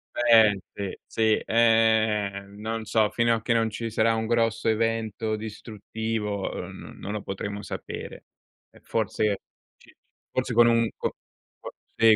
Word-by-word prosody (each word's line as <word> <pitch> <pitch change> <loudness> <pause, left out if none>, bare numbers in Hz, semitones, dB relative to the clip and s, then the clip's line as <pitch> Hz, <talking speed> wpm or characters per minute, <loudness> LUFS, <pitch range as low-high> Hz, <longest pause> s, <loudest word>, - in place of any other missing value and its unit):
Eh 110 -4 +5 0.2
sì, 100 -2 -4
sì, 110 -1 +2
ehm, 110 -3 +2
non 110 +1 -3
so, 110 -1 +2
fino 115 0 +2
a 115 - -1
che 115 - +1
non 115 -1 +1
ci 115 +2 -4
sarà 115 +1 +2
un 110 0 -1
grosso 115 -1 +1
evento 110 -1 0
distruttivo, 110 -1 -4
uhm, - - -7
n - - -15
non 100 - -5
lo 105 - -4
potremo 100 +1 -5
sapere. - - -7 0.4
E - - -20
forse 105 -2 0 0.4
ci - - -21 0.4
forse 130 -1 -1
con 120 +1 +6
un 115 -1 +3
co - - -3 0.4
co - - -8 0.2
sì, 115 -1 +6
110 Hz, 155 wpm, -26 LUFS, 105-115 Hz, 0.4 s, con